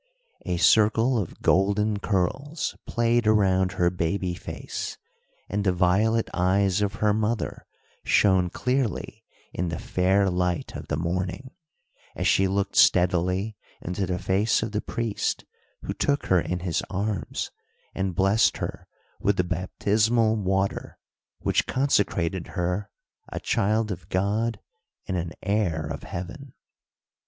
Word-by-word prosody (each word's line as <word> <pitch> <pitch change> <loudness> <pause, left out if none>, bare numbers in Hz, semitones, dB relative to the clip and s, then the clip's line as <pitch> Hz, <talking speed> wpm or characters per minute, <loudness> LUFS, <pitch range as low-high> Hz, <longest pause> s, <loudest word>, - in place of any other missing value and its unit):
A 90 -1 0
circle 110 +6 +4
of 95 - -6
golden 100 +2 +2
curls 130 - -1
played 115 -1 +1
around 95 -4 +3
her 85 0 +2
baby 90 +1 -1
face, - - -6 0.5
and 100 +1 -1
the 95 - +3
violet 100 +6 +2
eyes 95 +2 +2
of 100 -1 0
her 105 0 +2
mother 110 +1 -2 0.4
shone 95 -3 +3
clearly 125 +2 -2 0.3
in 90 0 -2
the 85 - -3
fair 95 +2 +2
light 90 -1 -1
of - - -7
the - - -1
morning, 90 - -3 0.6
as - - -3
she 95 - +4
looked 100 +1 -1
steadily 90 +4 +3 0.2
into 90 +2 -3
the 90 0 -1
face 100 +6 +1
of 110 - -3
the 105 0 -1
priest 115 -3 -2 0.4
who - - -3
took 140 0 0
her 95 - +4
in 90 +1 -3
his 85 -3 -1
arms 100 -4 -3 0.4
and 95 -2 -2
blessed 100 +5 +3
her - - -5 0.3
with 100 -1 +1
the 90 - +3
baptismal 105 +5 +1
water 95 -1 -1 0.4
which - - +1
consecrated 95 -10 +1
her 90 +3 -1 0.4
"a - - -3
child 110 +2 +1
of 90 0 -7
God 105 +4 0 0.5
and 95 - -2
an 85 -2 -3
heir 95 -6 0
of 75 -1 -5
heaven." 95 +11 -7
95 Hz, 135 wpm, -25 LUFS, 90-110 Hz, 0.6 s, circle